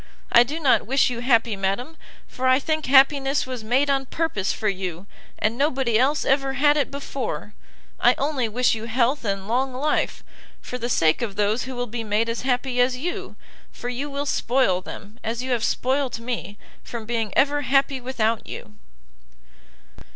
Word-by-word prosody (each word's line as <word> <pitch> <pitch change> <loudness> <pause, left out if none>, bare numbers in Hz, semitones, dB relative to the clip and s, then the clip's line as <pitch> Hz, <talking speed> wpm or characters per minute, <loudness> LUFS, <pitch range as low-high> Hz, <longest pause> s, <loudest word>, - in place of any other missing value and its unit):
I 235 - +8
do 290 +7 -1
not 275 -8 +3
wish 265 0 +3
you 235 - -4
happy, 235 -3 +2
madam, 200 +11 -2 0.3
for 260 +1 -2
I 255 0 +6
think 310 +2 -2
happiness 275 +1 +4
was 255 -3 -6
made 255 +6 +2
on 270 -1 0
purpose 285 - -1
for 215 - -3
you, 185 -2 -3 0.3
and 215 +2 0
nobody 265 -5 +1
else 280 +4 +2
ever 270 0 +1
had 290 +2 +4
it 285 -3 +1
before; 265 - -5 0.5
I - - +5
only 275 -5 -1
wish 245 +3 +2
you 225 0 -4
health 245 +4 +1
and 195 -2 -2
long 255 +3 0
life, 295 +4 -1 0.4
for 250 - -7
the 240 +1 -3
sake 165 -1 +2
of 215 -5 -3
those 210 +4 +1
who 260 0 -6
will 245 0 -2
be 235 0 -5
made 215 +2 0
as 230 - -2
happy 250 0 0
as 250 0 +2
you, 345 +7 -4 0.4
for 245 - -6
you 265 +4 -3
will 280 0 -3
spoil 245 -9 +1
them, 210 +4 -10
as 235 +2 -3
you 260 - -3
have 235 -2 0
spoilt 260 +1 0
me, 230 -3 -5 0.2
from 230 -2 -7
being 225 -2 -2
ever 290 +1 +3
happy 275 -1 +1
without 230 -3 -1
you!" 105 0 -9
250 Hz, 180 wpm, -23 LUFS, 225-275 Hz, 0.5 s, I